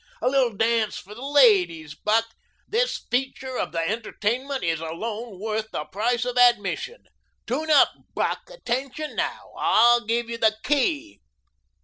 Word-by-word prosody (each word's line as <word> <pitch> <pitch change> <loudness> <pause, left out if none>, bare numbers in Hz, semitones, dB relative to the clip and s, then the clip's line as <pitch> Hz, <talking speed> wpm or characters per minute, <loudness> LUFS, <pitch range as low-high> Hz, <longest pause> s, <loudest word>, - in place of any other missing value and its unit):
A - - -1
little 255 -5 +2
dance 225 -1 +1
for 205 - -10
the 235 - -11
ladies, 190 - +3
Buck. 215 +8 +1 0.4
This - - -1
feature 260 0 -2
of - - -2
the 165 0 -1
entertainment 235 +5 -2
is 165 -2 0
alone 205 +6 -5
worth 220 +1 -3
the 150 - -4
price 240 +4 -1
of 250 0 -1
admission. 245 - +2 0.4
Tune 295 +7 -2
up, 300 - +6 0.3
Buck. - - 0
Attention 275 - -4
now! - - -3
I'll 240 +1 +4
give 230 +2 -1
you 230 0 -5
the 220 -1 +3
key." 295 +3 0
235 Hz, 145 wpm, -24 LUFS, 210-265 Hz, 0.4 s, up